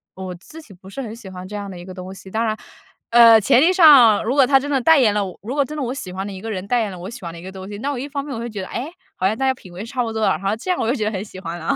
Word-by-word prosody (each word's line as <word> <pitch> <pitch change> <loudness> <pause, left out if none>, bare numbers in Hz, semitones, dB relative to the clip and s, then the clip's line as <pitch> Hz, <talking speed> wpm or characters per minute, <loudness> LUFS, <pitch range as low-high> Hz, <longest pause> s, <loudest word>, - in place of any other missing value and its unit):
我 185 -1 -6
自 315 - -13
己 215 -10 -16
不 185 +2 -15
是 270 - -6
很 225 -2 -7
喜 220 -5 -11
欢 185 0 -9
这 210 - -8
样 200 -1 -5
的 180 - -9
一 175 - -10
个 185 - -9
东 185 +1 -8
西。 190 0 -12
当 225 +1 0
然， 215 0 -1 0.5
呃， 230 -1 +8
前 245 +5 +4
提 335 +5 +5
上 280 - +7
如 250 +4 0
果 275 -2 +6
他 270 -1 +5
真 285 +2 -6
的 270 - +2
代 320 +2 +5
言 220 -6 +4
了 205 -1 0
我 185 - -9
如 245 +6 -5
果 285 - +3
真 305 +3 -7
的 295 - -3
我 250 +1 -2
喜 200 -10 -7
欢 190 +1 -4
的 200 - -6
一 190 - -9
个 225 0 -5
人 190 0 -5
代 245 0 +2
言 210 -3 -2
了 180 - -9
我 185 +3 -7
喜 240 - -10
欢 170 - -6
的 170 - -10
一 170 - -12
个 190 - -7
东 190 0 -9
西， 205 - -7
那 285 +4 -2
我 - - -5
一 280 +3 -5
方 280 -1 -3
面 285 - -6
我 - - -5
会 235 +1 -5
觉 210 -3 -6
得， 185 - -6
哎， 280 +7 -5 0.2
好 185 - -2
像 215 +3 -1
大 270 - -1
家 260 - +3
品 185 -8 -15
味 195 +5 -7
差 250 0 -2
不 225 - -4
多 220 - -3
了， - - +4
然 - - -15
后 195 +2 0
这 370 - -8
样 360 - -1
我 225 - -1
就 245 - +2
觉 215 - -2
得 215 - 0
很 195 -1 -4
喜 190 - -11
欢 170 -1 -6
了。 160 - -1
220 Hz, 430 characters per minute, -20 LUFS, 190-260 Hz, 0.5 s, 呃